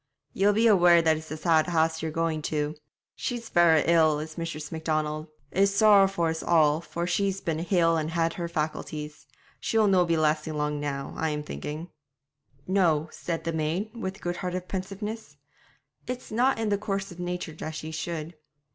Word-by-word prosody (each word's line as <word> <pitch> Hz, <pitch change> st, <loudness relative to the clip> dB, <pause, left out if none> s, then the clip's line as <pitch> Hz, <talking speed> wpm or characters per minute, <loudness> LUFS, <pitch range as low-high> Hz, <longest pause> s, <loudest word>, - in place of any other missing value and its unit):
'Ye'll 200 Hz, +1 st, +3 dB
be 220 Hz, +3 st, +2 dB
aware 175 Hz, -6 st, +6 dB
that 160 Hz, -1 st, +3 dB
it's 155 Hz, 0 st, -8 dB
a 155 Hz, -, -5 dB
sad 160 Hz, 0 st, +3 dB
house 160 Hz, -2 st, +1 dB
ye're 160 Hz, -, -2 dB
going 160 Hz, 0 st, -1 dB
to. 150 Hz, 0 st, -1 dB, 0.4 s
She's 235 Hz, -2 st, -4 dB
verra 165 Hz, -3 st, +5 dB
ill 160 Hz, -3 st, +4 dB
is 155 Hz, +1 st, -7 dB
Mistress 155 Hz, -3 st, -5 dB
Macdonald. 155 Hz, -1 st, -2 dB, 0.2 s
It's 200 Hz, +1 st, +3 dB
sorrow 200 Hz, -2 st, +6 dB
for 175 Hz, -4 st, 0 dB
us 160 Hz, 0 st, -3 dB
all, 155 Hz, -2 st, +3 dB
for 170 Hz, 0 st, -4 dB
she's 195 Hz, +1 st, 0 dB
been 160 Hz, -4 st, -2 dB
hale 170 Hz, -1 st, +2 dB
and 155 Hz, 0 st, -1 dB
had 165 Hz, 0 st, 0 dB
her 170 Hz, -1 st, -4 dB
faculties. 150 Hz, -1 st, -4 dB, 0.3 s
She'll 220 Hz, -1 st, +2 dB
no' 190 Hz, -3 st, +4 dB
be 170 Hz, -1 st, +1 dB
lasting 155 Hz, 0 st, +1 dB
long 150 Hz, 0 st, -1 dB
now, 140 Hz, -1 st, -4 dB
I'm 150 Hz, -2 st, -1 dB
thinking.' 150 Hz, -, -6 dB, 0.7 s
'No,' 170 Hz, -5 st, +2 dB
said 165 Hz, -2 st, -4 dB
the 165 Hz, 0 st, -2 dB
maid, 165 Hz, +8 st, -2 dB
with 195 Hz, -3 st, -5 dB
good 175 Hz, 0 st, -3 dB
hearted 180 Hz, -1 st, -4 dB
pensiveness; 195 Hz, -3 st, -5 dB, 0.7 s
'it's 250 Hz, -1 st, -5 dB
not 250 Hz, +5 st, +2 dB
in 225 Hz, -1 st, -1 dB
the 205 Hz, -1 st, +1 dB
course 195 Hz, -2 st, -3 dB
of 175 Hz, -, -11 dB
nature 180 Hz, -2 st, -4 dB
that 155 Hz, 0 st, -6 dB
she 155 Hz, +1 st, -6 dB
should.' 160 Hz, 0 st, -4 dB
165 Hz, 180 wpm, -27 LUFS, 155-190 Hz, 0.7 s, aware